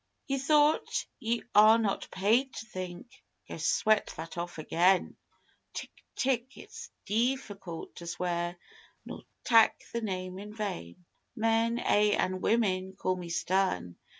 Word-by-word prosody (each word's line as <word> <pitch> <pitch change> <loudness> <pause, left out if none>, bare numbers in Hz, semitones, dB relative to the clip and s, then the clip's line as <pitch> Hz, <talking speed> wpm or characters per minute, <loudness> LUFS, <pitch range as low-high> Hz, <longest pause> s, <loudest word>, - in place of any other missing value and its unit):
Ye 275 -1 -1
thought? 295 +2 +3
Ye 230 +1 -1
are 215 +2 +8
not 215 -4 -1
paid 230 +8 +1
to - - -6
think. 185 +2 -8 0.3
Go, - - -7
sweat 210 +6 +2
that 165 +1 -7
off 175 0 -5
again!_ 180 +4 +2 0.6
Tck! - - -5 0.3
Tck! 260 0 -1
It's - - -10 0.2
deeficult 210 -7 -2
to 170 - -8
sweer 175 0 -2 0.5
nor - - -8 0.2
tak' 225 -2 +5
The 235 - -1
Name 185 -3 -4
in 210 +1 -9
vain! 175 - -5 0.3
Men, 225 +1 +2
ay 210 -3 +3
an' 185 0 -1
women, 190 -5 +1
call 185 -1 -1
me 180 -2 -7
stern. 170 - 0
200 Hz, 135 wpm, -30 LUFS, 180-230 Hz, 0.6 s, are